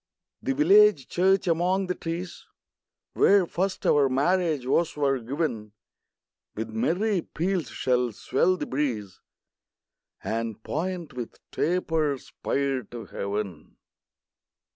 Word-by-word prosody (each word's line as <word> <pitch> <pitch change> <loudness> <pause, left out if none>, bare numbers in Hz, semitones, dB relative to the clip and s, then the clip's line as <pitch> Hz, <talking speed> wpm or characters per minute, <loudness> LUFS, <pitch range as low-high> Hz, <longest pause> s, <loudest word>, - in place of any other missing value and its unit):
The 270 0 -1
village 405 +8 +5
church, 190 +2 +3
among 180 +3 +2
the 180 - -1
trees, 170 +1 -6 0.7
Where 200 -2 +5
first 190 +3 -2
our 140 -2 +4
marriage 155 +1 +1
vows 155 +5 +1
were 135 -2 +1
giv'n, 120 -4 -3 0.8
With 110 +1 -4
merry 180 - +1
peals 175 -5 -2
shall 125 -1 0
swell 175 - +1
the - - -3
breeze, 115 -9 -2 1.0
And 115 -1 -3
point 175 +1 -3
with 120 -2 -6 0.2
taper 160 -4 0
spire 135 0 -2
to 115 +1 -8
heav'n. 100 -5 -5
150 Hz, 110 wpm, -26 LUFS, 120-180 Hz, 1.0 s, village